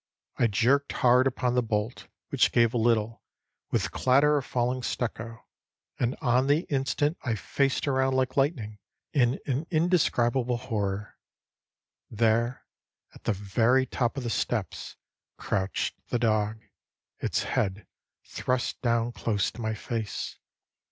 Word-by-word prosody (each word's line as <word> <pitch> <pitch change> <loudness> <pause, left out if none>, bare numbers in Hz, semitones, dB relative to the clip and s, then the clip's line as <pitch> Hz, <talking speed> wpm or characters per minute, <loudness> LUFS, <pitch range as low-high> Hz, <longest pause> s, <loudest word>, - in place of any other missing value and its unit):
I 120 - +5
jerked 125 +7 +2
hard 125 +1 +4
upon 125 -1 0
the 125 - +3
bolt, 110 0 -2 0.2
which - - +3
gave 115 -1 +3
a - - +1
little, 115 -1 +1 0.5
with - - 0
clatter 140 +4 +4
of 135 - -9
falling 125 +1 0
stucco; 115 -2 -4 0.5
and 120 +1 0
on 125 +2 +3
the 145 +3 +3
instant 145 +3 0
I 120 -4 0
faced 135 +7 0
around 130 -1 +2
like 130 -1 0
lightning, 125 -8 0 0.3
in 125 -2 +2
an 140 +4 -2
indescribable 130 -8 +2
horror. 105 -5 -3 0.9
There, 115 +3 +1 0.5
at - - -17
the 115 - +2
very 115 +6 +2
top 125 0 -1
of 135 - -3
the 120 - -2
steps, 105 -6 -2 0.4
crouched 95 0 -1 0.2
the - - +1
dog, 110 -1 0 0.6
its - - -1
head 95 -1 -1 0.4
thrust 125 -1 -2
down 115 -1 +1
close 105 -4 -1
to 120 - -9
my 110 0 -1
face. 110 0 -4
120 Hz, 135 wpm, -27 LUFS, 110-130 Hz, 0.9 s, I